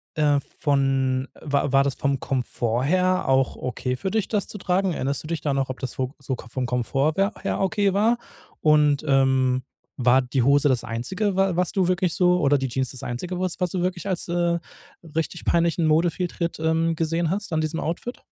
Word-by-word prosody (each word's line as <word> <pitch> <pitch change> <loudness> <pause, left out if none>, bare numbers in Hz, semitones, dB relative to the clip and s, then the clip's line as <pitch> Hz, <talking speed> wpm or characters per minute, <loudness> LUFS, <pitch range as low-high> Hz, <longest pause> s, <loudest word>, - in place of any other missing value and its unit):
äh, 145 -2 +3 0.2
von 135 -2 +1
war 140 -2 0
war 135 0 +5
das 140 -2 -1
vom 140 -1 0
Komfort 120 -2 -1
her 185 +2 +2
auch 135 -1 +2
okay 125 0 -3
für 185 +10 -3
dich, 220 -2 0
das 210 -3 -1
zu - - -6
tragen? 185 -1 0
Erinnerst 140 0 -2
du 155 - -8
dich 165 -2 -3
da 145 -3 0
noch, 135 -1 -1
ob 130 - -5
das 130 -3 -4
vo 130 +1 -2
so 135 -1 -3
Ko 120 - -12
vom 130 +1 -2
Komfort 130 +5 0
wer 195 +2 +1
her - - -2
okay 200 0 +1
war? 225 +4 +3 0.4
Und, 150 -1 +4
ähm, 130 -2 +3 0.4
war 125 +2 +5
die 125 0 -1
Hose 145 +2 +4
das 125 -3 +1
Einzige, 190 - -2
wa 195 -2 +2
was 180 -1 +1
du 190 -3 +2
wirklich 180 -2 +1
so 180 -1 +3
oder 145 -2 +3
die 135 -1 -2
Jeans 130 +1 -1
das 130 - -7
Einzige, 175 +10 -4
was 185 -2 -1
du 185 - -2
wirklich 180 +1 -2
als, 185 -3 -2
äh, 170 0 +1 0.6
richtig 165 +1 -2
peinlichen 170 -1 +2
Modefehltritt, 170 +2 0
ähm, 160 +1 +1
gesehen 165 +1 0
hast 195 +1 -3
an 155 - +1
diesem 155 +1 -2
Outfit? 175 +10 -4
155 Hz, 205 wpm, -24 LUFS, 135-180 Hz, 0.6 s, war